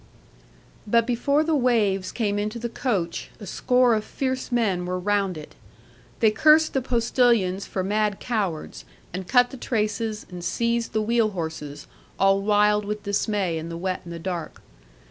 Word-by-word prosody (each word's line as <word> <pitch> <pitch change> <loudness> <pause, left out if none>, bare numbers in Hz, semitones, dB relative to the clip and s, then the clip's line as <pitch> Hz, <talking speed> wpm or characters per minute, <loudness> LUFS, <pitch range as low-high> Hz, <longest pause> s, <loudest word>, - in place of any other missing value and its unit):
'But 230 +2 +3
before 280 +5 +1
the 320 0 0
waves 215 -8 +1
came 205 -3 -1
into 210 +3 -3
the 235 0 -4
coach, 195 -10 -2
a 210 - -8
score 250 +5 +2
of 215 -1 0
fierce 260 +2 -3
men 195 -7 0
were 180 0 -1
round 195 -1 0
it. 150 - -10 0.7
They 220 -2 +5
cursed 310 +6 +5
the 270 - +1
postilions 235 -6 +1
for 190 - -3
mad 210 +1 0
cowards, 195 - -3 0.3
and 185 0 -5
cut 245 -1 +4
the 265 - -8
traces, 220 -2 -2
and 175 -1 -7
seized 235 +3 -1
the 215 0 +1
wheel 230 0 +2
horses, 150 -3 -5 0.3
all 195 0 +3
wild 210 0 +3
with 210 +1 -4
dismay 200 -4 -1
in 165 +1 -6
the 165 - -5
wet 185 +1 -2
and 170 - -9
the 170 - -5
dark. 170 -1 -5
210 Hz, 165 wpm, -24 LUFS, 185-235 Hz, 0.7 s, They